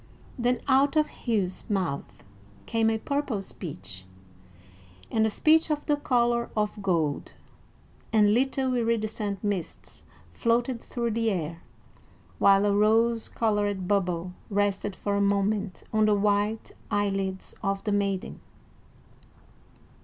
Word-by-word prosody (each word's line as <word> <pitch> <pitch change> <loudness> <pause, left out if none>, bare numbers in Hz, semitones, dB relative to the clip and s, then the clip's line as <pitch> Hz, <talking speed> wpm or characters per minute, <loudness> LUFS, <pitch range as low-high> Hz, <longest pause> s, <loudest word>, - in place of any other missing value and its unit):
Then 245 0 0
out 275 +2 +4
of 305 -1 +3 0.2
Hugh's 200 -6 0
mouth 185 -9 -2 0.4
came 225 -1 +2
a 225 - +1
purple 280 -2 -2
speech, 160 - -7 1.1
and 220 -1 +3
a - - 0
speech 315 +9 +3
of 300 -1 -1
the 295 - +2
color 240 -4 +1
of 210 0 -1
gold; 165 -7 0 0.8
and 210 -2 +5
little 265 +1 +1
iridescent 220 -4 -1
mists 200 -5 -4 0.3
floated 235 - 0
through 235 -1 -3
the 225 +1 +1
air, 170 -4 -3 0.8
while 195 0 +5
a 200 -1 +2
rose 225 +2 +3
colored 205 -4 0
bubble 180 -3 0 0.2
rested 205 -1 0
for 205 - -2
a 200 - +1
moment 200 -1 0
on 215 0 +4
the 210 -1 +4
white 205 +2 0 0.2
eyelids 195 -2 -1
of 195 0 -1
the 210 - -1
maiden. 200 -2 -1
210 Hz, 125 wpm, -27 LUFS, 195-230 Hz, 1.1 s, and